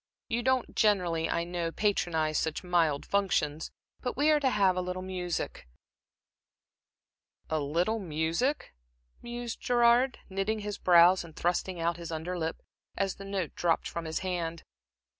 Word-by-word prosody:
You 235 Hz, +1 st, 0 dB
don't 260 Hz, 0 st, 0 dB
generally, 180 Hz, -7 st, +2 dB
I 170 Hz, -, 0 dB
know, 170 Hz, -1 st, -3 dB
patronize 165 Hz, -6 st, +1 dB
such 160 Hz, -1 st, -2 dB
mild 165 Hz, -5 st, +1 dB
functions, 175 Hz, -6 st, 0 dB, 0.3 s
but 250 Hz, -1 st, -3 dB
we 295 Hz, +2 st, +4 dB
are 300 Hz, -, +4 dB
to 275 Hz, -2 st, +2 dB
have 195 Hz, -5 st, +3 dB
a 185 Hz, -, 0 dB
little 180 Hz, 0 st, -4 dB
music" 180 Hz, -, -4 dB, 1.8 s
"A 155 Hz, -, +1 dB
little 170 Hz, +10 st, 0 dB
music?" 165 Hz, -, -1 dB, 0.5 s
mused 240 Hz, -1 st, -6 dB
Gerard, 245 Hz, +1 st, +4 dB
knitting 195 Hz, +3 st, -2 dB
his 205 Hz, 0 st, -5 dB
brows 175 Hz, +1 st, +6 dB
and 165 Hz, -2 st, -13 dB
thrusting 175 Hz, +1 st, -1 dB
out 170 Hz, 0 st, 0 dB
his 170 Hz, -1 st, -7 dB
under 165 Hz, +3 st, -3 dB
lip, 165 Hz, -2 st, -3 dB, 0.3 s
as 195 Hz, -1 st, -1 dB
the 195 Hz, -, -9 dB
note 195 Hz, -4 st, -3 dB
dropped 170 Hz, -2 st, +1 dB
from 170 Hz, -1 st, -5 dB
his 160 Hz, 0 st, -3 dB
hand. 170 Hz, -3 st, -3 dB
180 Hz, 150 wpm, -29 LUFS, 165-210 Hz, 1.8 s, brows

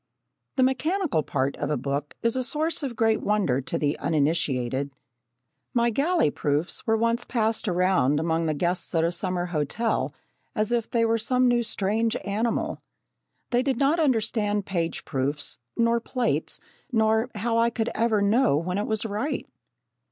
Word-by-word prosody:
The 260 Hz, -, +3 dB
mechanical 305 Hz, -, +1 dB
part 140 Hz, -1 st, -1 dB
of 145 Hz, -, -2 dB
a 150 Hz, -, +1 dB
book 140 Hz, +3 st, -3 dB
is 230 Hz, +1 st, +2 dB
a 260 Hz, -, +1 dB
source 310 Hz, +6 st, +1 dB
of 265 Hz, -5 st, -4 dB
great 225 Hz, -1 st, +2 dB
wonder 195 Hz, -12 st, +1 dB
to 165 Hz, -, -3 dB
the 145 Hz, -1 st, 0 dB
uninitiated. 140 Hz, -4 st, 0 dB, 0.8 s
My 235 Hz, 0 st, +3 dB
galley 285 Hz, -, +2 dB
proofs 150 Hz, +10 st, -1 dB
were 225 Hz, 0 st, +3 dB
once 230 Hz, +1 st, +1 dB
passed 225 Hz, -2 st, 0 dB
around 180 Hz, -7 st, +2 dB
among 165 Hz, 0 st, 0 dB
the 155 Hz, -, 0 dB
guests 175 Hz, +2 st, -1 dB
at 165 Hz, -, +3 dB
a 170 Hz, -, +2 dB
summer 175 Hz, 0 st, -1 dB
hotel 170 Hz, +10 st, 0 dB, 0.4 s
as 215 Hz, 0 st, 0 dB
if 235 Hz, -2 st, 0 dB
they 230 Hz, -1 st, +2 dB
were 230 Hz, 0 st, +2 dB
some 250 Hz, +3 st, +2 dB
new 240 Hz, -1 st, +3 dB
strange 220 Hz, +1 st, 0 dB
animal. 220 Hz, +3 st, -1 dB, 0.7 s
They 245 Hz, 0 st, +3 dB
did 265 Hz, -2 st, 0 dB
not 285 Hz, +5 st, +2 dB
understand 220 Hz, -7 st, +1 dB
page 170 Hz, -3 st, -2 dB
proofs 140 Hz, -1 st, -2 dB, 0.2 s
nor 235 Hz, 0 st, +3 dB
plates, 245 Hz, +1 st, -1 dB, 0.3 s
nor 220 Hz, +1 st, +2 dB
how 230 Hz, +2 st, 0 dB
I 230 Hz, 0 st, +4 dB
could 235 Hz, 0 st, -2 dB
ever 220 Hz, -3 st, +2 dB
know 220 Hz, -, +3 dB
when 180 Hz, +5 st, -1 dB
it 210 Hz, -, -2 dB
was 220 Hz, +1 st, 0 dB
right. 220 Hz, +8 st, -2 dB
215 Hz, 165 wpm, -26 LUFS, 165-235 Hz, 0.8 s, I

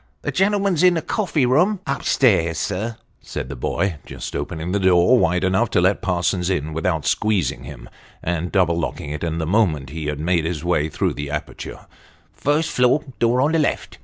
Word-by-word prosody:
" 70 Hz, -, -45 dB
The -, -, -1 dB
gentleman's 195 Hz, -3 st, +1 dB
in 180 Hz, -1 st, +5 dB
the 165 Hz, -, -2 dB
coffee 180 Hz, -, 0 dB
room." 175 Hz, +11 st, +3 dB
" -, -, -40 dB
Up 140 Hz, 0 st, -2 dB
stairs, 85 Hz, -, +3 dB
sir," 110 Hz, +6 st, -3 dB, 0.2 s
said -, -, -6 dB
the 70 Hz, -, -5 dB
boy, 85 Hz, +7 st, -1 dB
just -, -, -7 dB
opening 80 Hz, +2 st, -4 dB
the 100 Hz, -, +1 dB
door 95 Hz, +6 st, +4 dB
wide 90 Hz, -1 st, +1 dB
enough 95 Hz, +5 st, +2 dB
to -, -, +2 dB
let 95 Hz, +3 st, +2 dB
Parsons 90 Hz, 0 st, 0 dB
in 80 Hz, -4 st, -1 dB
without 80 Hz, -1 st, -1 dB
squeezing 100 Hz, -, 0 dB
him, 70 Hz, -2 st, -10 dB, 0.4 s
and 85 Hz, 0 st, -2 dB
double 85 Hz, -4 st, +2 dB
locking 75 Hz, -3 st, -4 dB
it 75 Hz, -, -5 dB
the 85 Hz, -, -1 dB, 0.2 s
moment 80 Hz, -, +1 dB
he 80 Hz, -1 st, -5 dB
had 75 Hz, -1 st, -3 dB
made 85 Hz, +1 st, +1 dB
his 85 Hz, -1 st, -3 dB
way 80 Hz, -3 st, +1 dB
through -, -, -1 dB
the 70 Hz, 0 st, -5 dB
aperture 75 Hz, +1 st, -6 dB, 0.3 s
" -, -, -34 dB
First 150 Hz, +3 st, +2 dB
floor 125 Hz, +4 st, +3 dB, 0.2 s
door 120 Hz, +2 st, +3 dB
on 145 Hz, +3 st, +2 dB
the 165 Hz, -, +2 dB
left." 150 Hz, -, -2 dB
90 Hz, 205 wpm, -21 LUFS, 80-125 Hz, 0.4 s, in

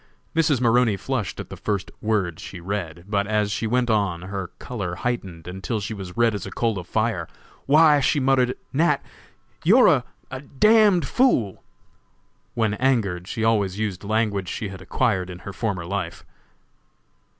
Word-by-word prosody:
Mrs. 155 Hz, -5 st, +3 dB
Maroney 120 Hz, -3 st, +3 dB
flushed 120 Hz, -1 st, -3 dB
at -, -, -7 dB
the -, -, -5 dB
first 100 Hz, -3 st, -3 dB
word 100 Hz, -7 st, 0 dB
she 90 Hz, -, -8 dB
read, 85 Hz, -2 st, -4 dB
but 100 Hz, -1 st, 0 dB
as 105 Hz, -1 st, +1 dB
she 110 Hz, +2 st, -1 dB
went 125 Hz, +2 st, +1 dB
on 100 Hz, -6 st, 0 dB
her 95 Hz, -1 st, -4 dB
color 100 Hz, -8 st, -5 dB
heightened, 95 Hz, -5 st, -4 dB
until 95 Hz, +5 st, -3 dB
she 105 Hz, +2 st, -4 dB
was 95 Hz, -2 st, -8 dB
red 115 Hz, -1 st, +3 dB
as 100 Hz, -3 st, -4 dB
a -, -, -5 dB
coal 115 Hz, -4 st, -1 dB
of 90 Hz, -, -9 dB
fire. 110 Hz, -7 st, -1 dB, 0.4 s
"Why," 150 Hz, +1 st, +6 dB
she 140 Hz, +2 st, +2 dB
muttered, 130 Hz, -2 st, +2 dB, 0.2 s
"Nat., 150 Hz, 0 st, +2 dB, 0.6 s
you're -, -, +5 dB, 0.3 s
a 130 Hz, 0 st, -5 dB
d 140 Hz, -, -19 dB, 0.4 s
d 180 Hz, -3 st, +2 dB
fool!" 135 Hz, -, +1 dB, 0.9 s
When 110 Hz, -3 st, +1 dB
angered 105 Hz, -7 st, 0 dB
she 110 Hz, -, -3 dB
always 105 Hz, -4 st, +1 dB
used 105 Hz, -4 st, -3 dB
language 105 Hz, -3 st, 0 dB
she 105 Hz, -4 st, -4 dB
had 95 Hz, -1 st, -9 dB
acquired 100 Hz, -8 st, 0 dB
in 90 Hz, -, -7 dB
her 100 Hz, -, -6 dB
former 100 Hz, -7 st, -2 dB
life. 100 Hz, +2 st, -4 dB
105 Hz, 165 wpm, -23 LUFS, 95-125 Hz, 0.9 s, Why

